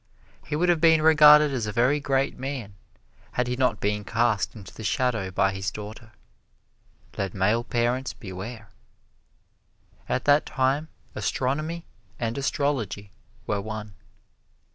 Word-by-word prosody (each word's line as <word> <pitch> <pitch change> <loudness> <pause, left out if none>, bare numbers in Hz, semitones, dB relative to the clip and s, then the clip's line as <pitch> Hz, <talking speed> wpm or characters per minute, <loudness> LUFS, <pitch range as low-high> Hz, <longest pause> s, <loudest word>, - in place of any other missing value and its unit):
He - - -2
would 175 +4 +1
have 170 -3 +3
been 160 -2 +5
regarded 150 -1 +7
as 120 -5 -2
a - - -2
very 125 +7 +2
great 135 -1 0
man 130 -6 -5 0.6
had 125 - 0
he 125 +1 -2
not 125 -4 +1
been 105 0 -1
cast 115 -2 0
into 100 -4 -11
the 110 - -9
shadow 115 -3 0
by 95 +1 +1
his 95 0 -2
daughter. 110 +2 -9 1.1
Let 95 -1 -2
male 105 +5 +2
parents 120 +2 -1
beware. 105 +3 -8 1.4
At 130 - -1
that 145 +1 +4
time, 135 +4 0 0.3
astronomy 155 +6 -2 0.3
and 115 -1 -2
astrology 130 -8 -2 0.3
were 100 -2 -1
one. 110 0 -6
120 Hz, 135 wpm, -25 LUFS, 105-140 Hz, 1.4 s, regarded